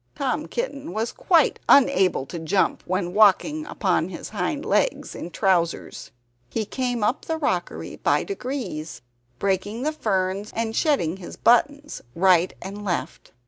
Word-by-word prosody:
Tom - - -2
Kitten 285 - -4
was 220 +3 -1
quite 330 -6 +2
unable 250 - +4
to 170 +5 -7
jump 165 +4 +1
when 180 -1 -1
walking 220 +10 +4
upon - - 0
his - - -7
hind - - -2
legs - - 0
in 170 - -7
trousers. 175 -2 0 0.4
He 220 - -2
came 245 0 -2
up 240 +8 0
the 320 - -2
rockery 185 - -2
by - - +1
degrees, 245 - -5 0.3
breaking 200 - -1
the 305 - +1
ferns 190 -6 -1
and 225 -1 -2
shedding 195 - +1 0.2
buttons 285 +5 +2
right 180 0 +4
and 200 +2 -7
left. 180 -4 -4
210 Hz, 140 wpm, -24 LUFS, 185-275 Hz, 0.4 s, unable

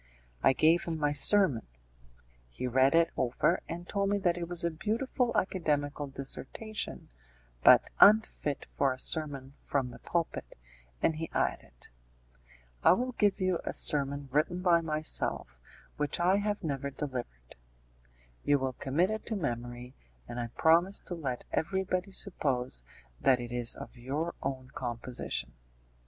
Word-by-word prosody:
I - - +5
gave 160 +5 +3
him 165 -1 -3
my 145 -1 0
sermon: 175 - +4 0.8
he - - -6
read 130 +3 +3
it 170 0 +4
over, 130 +8 +1
and 175 +1 -6
told 200 -1 0
me 205 - +2
that 180 -4 +1
it 175 -1 -4
was 175 -1 -1
a 170 - 0
beautiful 235 - -1
academical 145 -6 -1
dissertation, 140 +10 -3 0.6
but - - +8 0.2
unfit 205 -9 +4
for 140 -1 +1
a 130 - -4
sermon 140 -1 -1
from 135 -3 -2
the - - -12
pulpit, 170 -1 -3 0.5
and 160 - +2
he 165 +1 -4
added, - - -3 0.9
"I - - +7
will 250 +6 -1
give 205 -4 +1
you 185 -2 +1
a - - -3
sermon 140 -1 +1
written 170 +6 0
by 170 -2 +4
myself, 155 - -1 0.4
which 150 +2 0
I 180 +3 +3
have 205 0 -2
never 140 -3 -2
delivered; 125 - -7 0.9
you 145 - +3
will 130 -1 -2
commit 155 +10 0
it 220 - -4
to 225 - -1
memory, 120 - -4 0.3
and 120 - -6
I 120 - -2
promise 170 - +3
to - - -7
let 135 -7 -4
everybody 185 +2 -1
suppose 130 - -1 0.4
that 130 -2 +3
it 120 -1 -6
is 120 -1 +4
of 125 - -10
your 145 +7 -3
own 130 -1 -4
composition." 120 - -4
150 Hz, 145 wpm, -30 LUFS, 130-180 Hz, 0.9 s, but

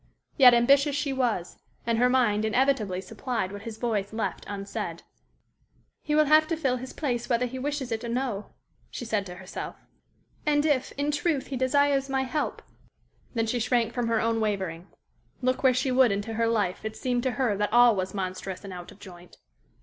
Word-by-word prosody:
Yet, 250 -4 +8
ambitious 275 +4 +4
she 285 -1 -1
was, 235 -9 -1 0.3
and 230 -1 +1
her 250 +1 +4
mind 235 -5 +2
inevitably 220 -5 +1
supplied 225 -1 -3
what 200 0 -7
his 220 0 -7
voice 215 -4 -1
left 220 0 -3
unsaid. 200 -1 -5 1.0
"He 300 - -1
will 305 0 +5
have 310 +1 +5
to 330 0 -1
fill 265 -5 0
his 255 +1 -7
place 245 -6 -3
whether 240 0 +2
he 260 +1 -5
wishes 280 -2 -3
it 225 +1 -2
or 235 - -4
no," 235 -4 -2 0.4
she 245 - -6
said 210 -3 -1
to 180 - -8
herself. 185 +1 -7 0.7
"And 295 0 +2
if, 285 -4 +1
in 285 +1 -1
truth, 295 -1 0
he 275 - -5
desires 275 +1 +2
my 265 0 +1
help 290 +3 -3 0.3
" - - -36
Then 225 -1 +1
she 240 +2 -1
shrank 235 -1 +1
from 245 -2 -1
her 230 -1 +2
own 230 0 0
wavering. 190 -5 -2 0.6
Look 255 0 +1
where 260 - +5
she 255 +1 0
would 255 -3 +5
into 205 +3 -2
her 230 +1 +1
life, 205 -5 0
it 220 0 -5
seemed 250 -2 0
to 260 - 0
her 250 -6 +1
that 205 0 0
all 240 -1 +6
was 185 0 -3
monstrous 185 0 -4
and 195 -2 -7
out 175 -1 -9
of - - -15
joint. 180 -3 -13
240 Hz, 200 wpm, -27 LUFS, 210-265 Hz, 1.0 s, Yet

